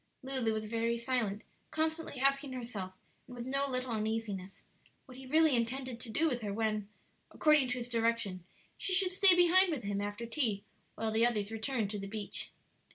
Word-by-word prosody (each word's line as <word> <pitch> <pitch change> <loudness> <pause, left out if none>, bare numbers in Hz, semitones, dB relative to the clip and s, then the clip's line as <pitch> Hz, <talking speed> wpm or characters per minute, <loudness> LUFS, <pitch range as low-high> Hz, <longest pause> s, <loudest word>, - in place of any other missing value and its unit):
Lulu 260 -4 0
was 215 0 -2
very 230 +1 0
silent, 235 -4 -1 0.3
constantly 315 -3 -2
asking 275 0 +2
herself, 225 -7 -5 0.3
and 250 - -10
with 240 -1 -6
no 275 +2 0
little 255 -1 -2
uneasiness, 215 -3 -3 0.4
what 255 -1 -13
he 265 - -10
really 310 0 +4
intended 245 +1 -2
to 240 - -6
do 320 +9 +2
with 250 -5 -1
her 205 -2 -3
when, 215 -1 -1 0.4
according 300 -4 +4
to 245 0 -1
his 240 -1 -4
direction, 230 -6 0 0.4
she 375 - +1
should 370 -1 +2
stay 375 0 +7
behind 355 +1 +5
with 280 -7 -3
him 200 0 -2
after 205 +3 -4
tea 230 -5 0 0.3
while 220 0 -2
the 220 +1 +2
others 220 -3 +1
returned 225 -2 -1
to 210 - -3
the 195 - -5
beach. 210 0 -4
235 Hz, 185 wpm, -33 LUFS, 215-270 Hz, 0.4 s, stay